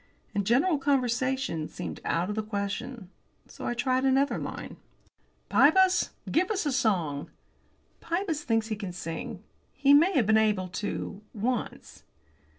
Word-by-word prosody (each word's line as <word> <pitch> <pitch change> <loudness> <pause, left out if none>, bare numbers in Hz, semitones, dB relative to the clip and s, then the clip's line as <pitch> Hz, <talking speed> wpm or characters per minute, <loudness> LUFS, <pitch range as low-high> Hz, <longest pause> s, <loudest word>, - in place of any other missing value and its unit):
And 200 -1 -1
general 285 +7 +3
conversation 255 - 0
seemed - - -6
out 170 +2 0
of - - -4
the 220 - 0
question. 205 +1 -4 0.4
So - - -7
I 240 - -1
tried 255 +1 +1
another 270 +1 +2
line. - - -6 0.7
"Pybus, 355 - +4 0.2
give 355 +3 +2
us 410 -5 -1
a 290 - +1
song." 175 - 0 0.7
(Pybus 335 -3 -2
thinks 225 -1 0
he 215 - -1
can 200 -4 -6
sing. 175 +2 -6 0.3
He 275 +1 +4
may 335 +7 +6
have 255 - +3
been 220 +1 +4
able 210 -4 +1
to 205 +1 -4
once.) 235 +3 -3
240 Hz, 145 wpm, -28 LUFS, 205-280 Hz, 0.7 s, may